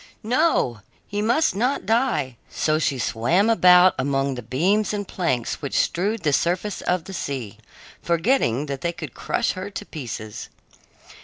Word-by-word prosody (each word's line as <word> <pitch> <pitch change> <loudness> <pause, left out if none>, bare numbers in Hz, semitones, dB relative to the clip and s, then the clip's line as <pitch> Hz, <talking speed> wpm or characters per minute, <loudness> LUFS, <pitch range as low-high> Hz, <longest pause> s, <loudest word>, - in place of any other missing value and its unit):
No, 240 - +1 0.3
he 205 0 -3
must 240 +7 +2
not 250 +7 0
die! 220 - +1
So 155 0 0
she 140 -3 0
swam 150 - +2
about 180 -3 +6
among 135 0 0
the 125 - -6
beams 195 +12 +1
and 205 -1 -4
planks 130 -10 -2
which 140 - -2
strewed 200 +3 0
the 150 -3 +2
surface 180 +7 0
of 180 -2 0
the 195 - -9
sea, 130 - -5 0.4
forgetting 170 - +1
that 140 -2 -5
they 170 0 -1
could 155 -5 -8
crush - - -1
her 185 +2 -6
to 205 +1 -7
pieces. 115 - -7
170 Hz, 155 wpm, -23 LUFS, 135-205 Hz, 0.4 s, about